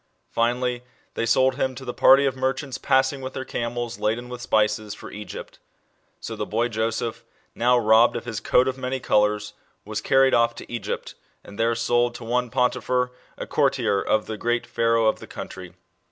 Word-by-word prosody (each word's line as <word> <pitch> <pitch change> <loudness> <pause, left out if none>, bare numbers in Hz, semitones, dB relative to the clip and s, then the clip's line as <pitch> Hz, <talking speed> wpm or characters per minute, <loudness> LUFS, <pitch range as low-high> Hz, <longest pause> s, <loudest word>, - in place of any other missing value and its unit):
Finally, 120 +1 0 0.3
they 115 - -2
sold 130 +2 +3
him 130 -2 -1
to 130 - -9
the 125 - -4
party 135 +1 +6
of 135 -2 0
merchants 130 +1 -2
passing 135 +1 +2
with 130 0 -6
their 130 - -5
camels, 120 0 -4
laden 115 +3 -1
with 125 0 -7
spices, 105 -2 +1
for - - -10
Egypt. 105 0 -9 0.6
So - - -6
the - - -3
boy 115 +3 0
Joseph, 110 0 -2 0.3
now 125 +1 +3
robbed 110 0 +5
of - - -4
his 115 -3 -4
coat 125 +1 +3
of 130 0 -2
many 130 +1 -2
colours, 105 -2 +1 0.3
was 105 0 -4
carried 135 +3 +4
off 115 0 +3
to - - -10
Egypt, 120 - -4 0.3
and 100 - -12
there 115 +1 +2
sold 120 +1 +1
to - - -8
one 125 +1 0
Potiphar, 125 0 0 0.3
a - - -5
courtier 100 -1 +1
of 110 - +1
the 110 - -5
great 120 +2 -1
Pharaoh 115 -1 +1
of 110 - +2
the - - -11
country. - - -9
120 Hz, 185 wpm, -24 LUFS, 110-125 Hz, 0.6 s, party